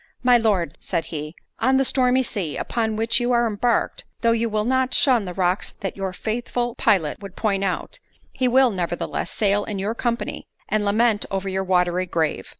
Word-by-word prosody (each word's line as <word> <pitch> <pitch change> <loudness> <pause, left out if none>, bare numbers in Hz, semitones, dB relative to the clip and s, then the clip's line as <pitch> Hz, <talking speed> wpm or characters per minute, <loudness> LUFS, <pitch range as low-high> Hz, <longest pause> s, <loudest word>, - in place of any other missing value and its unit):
"My 250 -1 +6
Lord," 200 -9 +1
said 170 -3 -2
he, 150 +1 -5 0.2
"on 260 +3 +3
the 270 - +3
stormy 255 0 +3
sea, 195 -11 -3
upon 225 -2 -1
which 225 +1 +1
you 245 +1 0
are 240 0 +3
embarked, 225 +2 0 0.2
though 230 0 +3
you 230 0 +1
will 215 0 -1
not 260 +1 +1
shun 245 -7 +4
the 180 - -5
rocks 185 0 0
that 195 - -3
your 195 -1 -3
faithful 240 +4 -2
pilot 165 -10 +1
would 195 -2 -9
point 200 -3 0
out, 190 -2 -3 0.3
he 255 - 0
will, 255 0 +4
nevertheless, 175 -3 -3
sail 205 -1 +1
in 205 -1 -4
your 200 +3 -1
company, 235 0 -3 0.2
and 215 -1 0
lament 215 +1 +2
over 195 0 -3
your 190 0 -1
watery 180 -1 +1
grave. 160 -3 -1
215 Hz, 190 wpm, -23 LUFS, 190-240 Hz, 0.3 s, My